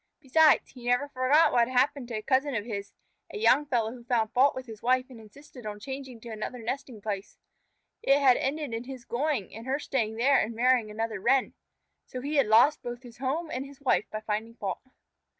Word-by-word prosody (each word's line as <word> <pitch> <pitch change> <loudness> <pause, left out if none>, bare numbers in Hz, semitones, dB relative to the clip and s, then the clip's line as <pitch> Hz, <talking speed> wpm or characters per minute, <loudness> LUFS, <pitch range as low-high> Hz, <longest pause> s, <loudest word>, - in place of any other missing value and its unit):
Besides, 310 +2 +4
he 245 -2 -10
never 245 +4 +2
forgot 280 +4 +4
what 235 -1 +3
had 255 0 -3
happened 265 0 +2
to 235 - -5
a 215 - -4
cousin 270 +2 +1
of 210 -1 -2
his, 200 -4 -5 0.4
a - - -6
young 295 - +4
fellow 235 -5 0
who 240 0 -11
found 235 -2 0
fault 270 +3 +4
with 260 0 -6
his 220 -3 -10
wife 255 +1 +1
and 240 - -11
insisted 245 +4 -14
on 210 -1 -6
changing 265 0 -7
to 235 - -9
another 220 +3 -5
nesting 240 -1 -5
place. 200 -2 -5 0.6
It 275 - +4
had 270 -3 +5
ended 280 -1 -2
in 230 +2 -4
his 255 -2 -9
going, 260 - -2
and 225 +3 -9
her 270 +2 +1
staying 230 -7 -2
there 270 +5 +4
and 225 +2 -2
marrying 245 -2 +3
another 220 0 -3
Wren. 260 +5 +2 0.5
So 255 - -6
he 290 +4 -2
had 275 - +4
lost 230 +7 +5
both 240 +1 -7
his 240 -1 -13
home 305 +5 -2
and 255 - -3
his 275 0 -13
wife 265 -6 +2
by 215 - -5
finding 220 +2 -3
fault. 195 -5 -4
250 Hz, 220 wpm, -28 LUFS, 225-275 Hz, 0.6 s, had